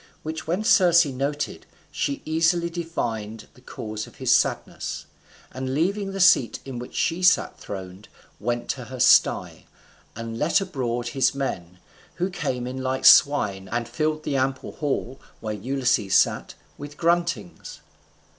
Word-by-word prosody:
Which 160 0 -5
when 180 +6 -1
Circe 175 -6 +5
noted, 140 +2 -3 0.2
she 140 -1 -2
easily 165 +2 +1
divined 115 -11 -4
the 125 - -20
cause 110 -3 -6
of - - -16
his - - +2
sadness, - - -1 0.5
and 130 +1 -4
leaving 195 +5 0
the 195 - -5
seat 135 - +4
in 130 -3 -6
which 125 - -9
she 170 +2 0
sat 180 0 +3
throned, 95 0 -8 0.3
went 120 +2 -2
to - - -3
her - - -9
sty, - - +3 0.5
and 115 0 -6
let 160 +6 +3
abroad 125 -10 -3
his 130 +1 +1
men, 90 -10 -4 0.4
who 180 +2 -2
came 130 -8 -3
in 130 +1 -5
like 130 0 -2
swine, 100 -10 +5
and 120 0 -2
filled 155 +5 -2
the 140 - -1
ample 130 0 -1
hall, 135 -3 -3 0.2
where 110 -1 -4
Ulysses 125 -2 0
sat, - - +2 0.2
with 145 0 -9
gruntings. 170 - -1
135 Hz, 145 wpm, -24 LUFS, 115-165 Hz, 0.5 s, Circe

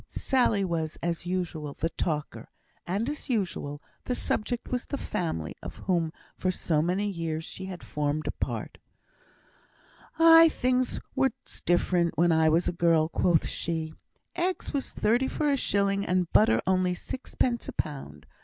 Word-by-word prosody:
Sally 235 -7 +2
was, 160 -3 -2
as 170 0 -2
usual, 165 -5 -3
the 165 - -1
talker; 150 -3 -3 0.4
and, 200 +7 -1
as 295 0 -5
usual, 175 - -2 0.2
the 250 - -1
subject 240 +1 -2
was 250 -1 -2
the 280 - -3
family 80 - -3
of - - -7
whom 170 -4 +1 0.2
for 185 - -1
so 160 -4 +1
many 185 +5 0
years 165 -4 -3
she 190 - -7
had 185 -2 -7
formed 150 +1 -2
a - - -1
part. - - -4 1.4
"Aye! 330 0 +8
things 255 -3 0 0.2
was 265 - +3 0.4
different 175 -1 +2
when 175 +1 +4
I 160 -1 +4
was 165 +3 +2
a - - 0
girl," 165 -2 +3
quoth 170 0 +2
she. 160 -1 -3 0.4
"Eggs 360 -1 -2
was 280 -2 -2
thirty 240 +5 +2
for 295 +1 0
a - - +3
shilling, 200 -5 +1
and 180 -3 0
butter 215 - +5
only 185 0 +2
sixpence 245 +3 -2
a - - -5
pound. 105 - -5
180 Hz, 155 wpm, -28 LUFS, 160-235 Hz, 1.4 s, Aye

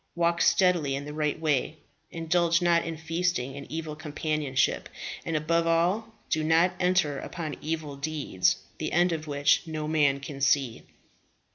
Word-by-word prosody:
Walk 170 0 +1
steadily 175 -7 +3
in 140 +1 -5
the 150 - -7
right 150 0 -1
way; 155 -1 0 0.3
indulge 170 0 +1
not 170 -2 +3
in 165 -1 -5
feasting 160 -4 -1
and 140 - -9
evil 155 -1 -4
companionship; 150 -3 -1 0.3
and 165 - -3
above 165 +2 +1
all, 185 +7 +1 0.2
do 155 - +1
not 165 +3 +3
enter 180 -6 +2
upon 160 -3 -5
evil 155 -2 -3
deeds, 145 -10 0 0.2
the - - -3
end 175 +2 +3
of 160 -1 -3
which 145 +3 +2
no 155 -1 -4
man 145 -3 +2
can 140 0 -8
see." 135 -4 +1
155 Hz, 155 wpm, -27 LUFS, 145-170 Hz, 0.3 s, steadily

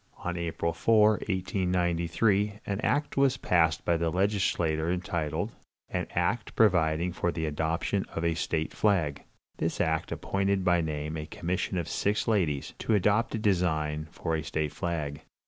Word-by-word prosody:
On 90 0 -4
April 85 -1 -2
4, 110 -2 +5 0.2
1893, 95 +2 +1
an 100 0 -2
act 145 +1 0
was 135 -1 +3
passed 80 -2 +2
by 85 - +3
the 85 0 0
legislature 90 -4 +1
entitled, 85 +1 -2 0.4
"An - - -2
act 90 +7 0
providing 85 -4 +3
for 85 -1 0
the 80 -1 -3
adoption 80 +5 -1
of 80 - -3
a 85 - +2
state 80 -1 -2
flag." 85 -9 +1 0.4
This 80 +1 -2
act 80 -1 0
appointed 95 -1 0
by 90 -2 +4
name 75 0 -3
a 75 0 -5
commission 90 +4 -2
of 85 - -2
six 105 +1 0
ladies, 85 -11 0
to 110 - +1
adopt 105 +4 +2
a - - 0
design 80 -7 0
for 80 - -2
a 80 - -1
state 75 0 -2
flag. 80 -5 -3
85 Hz, 155 wpm, -28 LUFS, 80-100 Hz, 0.4 s, 4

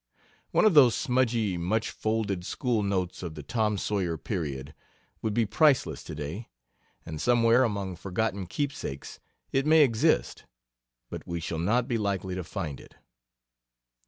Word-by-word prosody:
One - - +3
of 215 - +5
those 130 -6 +7
smudgy, 120 - +1
much 105 +6 -1
folded 110 -4 -1
school 115 +3 -1
notes 95 -3 -1
of 85 -4 -6
the 75 - -8
Tom 110 - 0
Sawyer 95 -5 -1
period 75 -5 -4 0.5
would 110 -2 -2
be 115 - +3
priceless 140 +6 +2
to 80 - -7
day, 80 +10 -6 0.6
and 80 -2 -6
somewhere 120 +1 +4
among 100 -5 -2
forgotten 95 +1 -2
keepsakes 135 - -4 0.3
it 135 +2 +1
may 160 0 +7
exist, 110 - +1 0.7
but - - -7
we 85 0 -3
shall 80 0 -4
not 115 +8 +1
be 120 -4 0
likely 100 -2 -2
to 90 0 -3
find 75 -4 -5
it. - - -16
100 Hz, 150 wpm, -28 LUFS, 85-120 Hz, 0.7 s, those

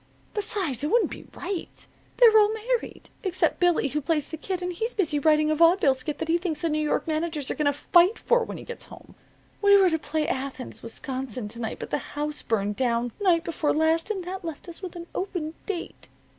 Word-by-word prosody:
Besides, 380 - -2
it - - +1
wouldn't 475 +4 +3
be - - -9
right. 385 -4 -5 0.3
They're 465 -3 +7
all 425 -1 +6
married, 460 +2 -3
except 370 -2 0
Billy, 350 -5 +3
who 300 +3 -1
plays 300 0 0
the - - -4
kid, 365 +3 -4
and 360 0 -2
he's 450 +7 -3
busy 320 -8 +1
writing 305 +1 +3
a - - +2
vawdeville 335 -3 +5
skit 285 +3 -4
that 325 - -3
he 335 +1 +2
thinks 325 -4 -3
the 335 - +1
New 305 0 0
York 300 - 0
managers 315 -3 -1
are - - +1
going 300 -2 0
to - - +5
fight 345 +7 +4
for 485 0 +2
when - - -6
he - - -9
gets 480 - -7
back - - -21
home. - - -14 0.5
We 400 -1 +7
were 380 -3 +5
to 320 - +1
play 305 0 -2
Athens, 265 -1 -4
Wisconsin, 255 -1 -5
to 235 +2 -5
night, 225 - -3
but - - -7
the - - +1 0.2
house 295 0 -1
burned 210 -2 -1
down 240 -2 +1
night 345 -4 +3
before 325 -2 0
last, 320 +3 +2
and 390 -4 -2
that 370 +2 -6
left 325 +1 -7
us 345 +1 -6
with 365 -3 -7
an 340 -1 -7
open 350 -5 -3
date. 380 -5 -5
325 Hz, 225 wpm, -26 LUFS, 290-370 Hz, 0.5 s, They're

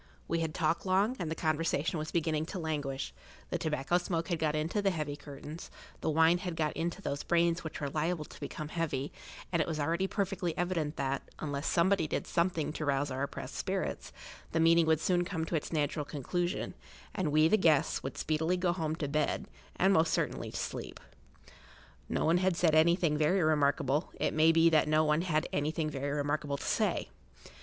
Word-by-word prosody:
We 165 - 0
had 160 -2 -2
talked 165 +1 +1
long, 195 +6 +2
and 170 - -2
the 160 - -2
conversation 160 0 0
was 155 +1 -4
beginning 160 -2 0
to 190 - -5
languish; 145 - -3 0.4
the - - -1
tobacco 155 +2 +1
smoke 170 -1 -2
had 170 -3 0
got 155 -1 +1
into 160 +7 0
the 200 - +3
heavy 155 -5 -2
curtains, 145 +2 -9 0.3
the - - -1
wine 160 +3 +4
had 180 -3 -4
got 155 -2 0
into 170 +4 -3
those 140 - -2
brains 170 0 +2
which 160 - -6
were 145 - -2
liable 155 +2 -1
to - - -13
become 155 -1 -5
heavy, 155 -5 -2 0.4
and 170 -3 +2
it - - -1
was 160 -2 -2
already 170 +6 +1
perfectly 195 -4 -2
evident 170 -4 -1
that, 135 0 -2
unless 145 -1 -3
somebody 175 -1 +3
did - - -2
something 170 -3 0
to 155 - -4
rouse 140 0 0
our 130 +1 -3
oppressed 140 - -4
spirits, - - -3 0.4
the 165 - +2
meeting 165 0 +5
would 160 -1 +4
soon 175 +2 +2
come 175 -3 -3
to 165 - -2
its 155 - -2
natural 150 -1 0
conclusion, 175 +5 -2 0.4
and 185 -7 -1
we, 155 +1 +5
the 190 - +4
guests, 160 -8 +3
would 135 - -6
speedily 160 +3 0
go 180 -1 +1
home 160 -3 -2
to 155 -3 -3
bed, 150 +1 0 0.3
and 190 +2 +4
most 160 -2 +3
certainly - - -1
to - - -6
sleep. - - -5 1.1
No - - 0
one 165 +2 +4
had 185 -2 +1
said 165 -3 +3
anything 160 -1 +4
very[Pg 155 +4 +3
4] - - +3
remarkable; 145 0 +2
it - - +1
may 160 +1 +5
be 165 0 +5
that 155 -1 +4
no 155 +1 +4
one 150 +1 +2
had 155 -4 0
anything 155 +1 -1
very 140 0 -3
remarkable 145 0 -1
to - - -7
say. - - 0
160 Hz, 200 wpm, -31 LUFS, 150-170 Hz, 1.1 s, meeting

